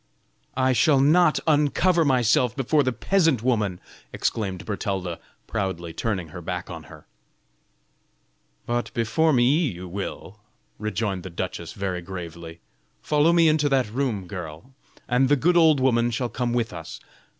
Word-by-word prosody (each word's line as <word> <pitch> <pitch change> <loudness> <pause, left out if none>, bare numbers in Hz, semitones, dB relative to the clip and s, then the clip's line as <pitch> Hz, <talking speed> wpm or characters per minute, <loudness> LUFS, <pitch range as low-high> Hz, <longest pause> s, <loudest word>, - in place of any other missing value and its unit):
"I 130 0 +3
shall 140 +2 +4
not 155 +3 +4
uncover 160 +3 +3
myself 125 -3 +2
before 145 +2 +2
the 130 -2 +1
peasant 160 - +1
woman!" 105 -8 0 0.3
exclaimed 95 -5 -2
Bertalda, 95 -4 -3 0.3
proudly 95 -6 -3
turning 95 -7 -3
her 90 +3 -9
back 90 +1 -5
on 80 -3 -8
her. - - -14 1.6
"But 120 0 -2
before 120 +8 +2
me 125 -4 +3 0.2
you 95 - -3
will." 100 +2 -6 0.4
rejoined 105 -2 -2
the 95 - -8
duchess, 85 - -5
very 95 -3 -3
gravely. 85 -2 -8 0.4
"Follow 150 +2 +2
me 170 -1 +5
into 155 -1 +2
that 130 -6 +1
room, 120 -6 -2
girl, 85 - -8 0.3
and 130 +2 +2
the 145 - +5
good 170 +6 +2
old 160 -4 +5
woman 120 -2 +2
shall 120 +1 -2
come 120 0 -2
with 120 -4 -1
us." 85 -2 -8
115 Hz, 145 wpm, -24 LUFS, 95-140 Hz, 1.6 s, me